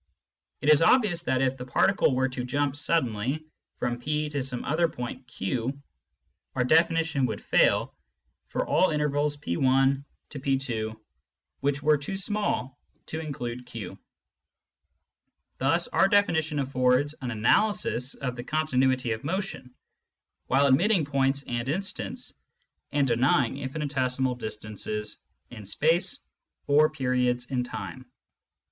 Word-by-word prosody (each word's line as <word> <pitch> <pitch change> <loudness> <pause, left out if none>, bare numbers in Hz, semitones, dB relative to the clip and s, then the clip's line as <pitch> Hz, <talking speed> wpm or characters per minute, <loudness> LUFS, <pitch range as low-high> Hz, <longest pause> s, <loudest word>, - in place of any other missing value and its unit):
It 150 - +4
is 150 - +6
obvious 185 -2 +4
that 130 0 +1
if 135 0 0
the 125 - -7
particle 145 +1 +3
were 130 +1 +2
to 130 -1 -4
jump 140 +2 -1
suddenly 140 -2 0 0.3
from 120 0 -2
P 150 +3 -1
to 145 -2 -2
some 130 -2 -4
other 165 +3 +2
point 125 -2 -7
Q, 125 +5 -3 0.8
our 125 - +2
definition 160 -1 +3
would 110 - -4
fail - - +2 0.5
for - - -2
all 185 - +3
intervals 150 -1 0
P^ 135 - 0
P, 130 -5 -1 0.7
which 145 +1 -1
were 150 -1 +4
too 190 +7 -4
small 195 - -1 0.3
to 160 - -4
include 125 -5 -5
Q. 105 -6 -7 1.6
Thus 165 +6 +2
our 190 - +4
definition 160 -7 +2
aflFords 130 +1 +2
an 125 - -3
analysis 125 - +1
of 125 -2 -4
the 120 - -6
continuity 130 -5 +1
of 110 0 -3
motion, 185 -5 -4 0.8
while 135 +2 +4
admitting 165 +6 +4
points 140 0 +1
and 120 0 -3
instants 200 - -3 0.6
and 140 -2 +2
denying 125 +1 +2
infinitesimal 130 -2 -1
distances 105 -2 -4 0.3
in 110 -3 -9
space 165 - +1 0.4
or 150 +2 +5
periods 125 -4 0
in 125 -2 0
time. 125 +1 -7
135 Hz, 125 wpm, -27 LUFS, 125-155 Hz, 1.6 s, is